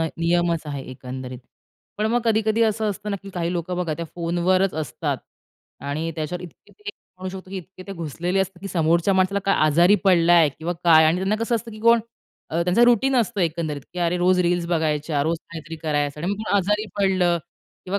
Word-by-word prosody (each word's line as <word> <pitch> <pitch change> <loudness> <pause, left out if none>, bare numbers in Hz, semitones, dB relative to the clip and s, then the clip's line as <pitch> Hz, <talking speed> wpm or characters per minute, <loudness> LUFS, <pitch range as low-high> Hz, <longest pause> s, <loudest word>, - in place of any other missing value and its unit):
न 165 - 0
नियमच 170 0 +1
आहे 140 -2 -4
एकंदरीत. 130 0 -7 0.6
पण 215 - +1
मग 240 +2 +1
कधी-कधी 220 0 +2
असं 220 -1 +1
असतं, 205 +1 -6
ना 200 - -1
की 200 - -9
काही 175 -2 -2
लोकं 175 0 -3
बघा 170 -3 -1
त्या 170 - -5
फोनवरच 175 +3 +1
असतात 155 -4 -3 0.7
आणि 155 +3 -2
त्याच्यावर 165 +3 -4
इतके 175 - -14
ते 410 0 -5 0.3
म्हणू 185 0 -5
शकतो 185 0 -9
की 195 - -5
इतके 185 +1 -10
ते 195 - -6
घुसलेले 170 +2 -3
असतात 190 -1 -3
की 195 - -6
समोरच्या 170 +2 +2
माणसाला 190 +2 +2
काय 195 - +3
आजारी 170 +6 +5
पडलाय 170 -4 +5
किंवा 160 +5 -4
काय 160 -2 +7
आणि 160 +2 +3
त्यांना 190 +3 0
कसं 235 - 0
असतं 230 0 -3
की 215 - -10
कोण 230 +1 +5 0.5
अ, 170 +2 0
त्यांचं 180 +7 +3
रूटीन 245 +3 +3
असतं 230 -3 0
एकंदरीत 160 -3 -1
की 180 - -7
अरे 175 0 +1
रोज 180 +1 +3
रील्स 175 -1 +1
बघायच्या, 155 -3 0
रोज 165 +3 0
काहीतरी 165 0 -7
करायचं 145 -1 -1
आणि 175 - -1
मग - - -3
कोण 205 - -1
आजारी 210 +3 +1
पडलं 185 -3 +2 0.5
किंवा 195 +2 -2
175 Hz, 205 wpm, -23 LUFS, 165-195 Hz, 0.7 s, काय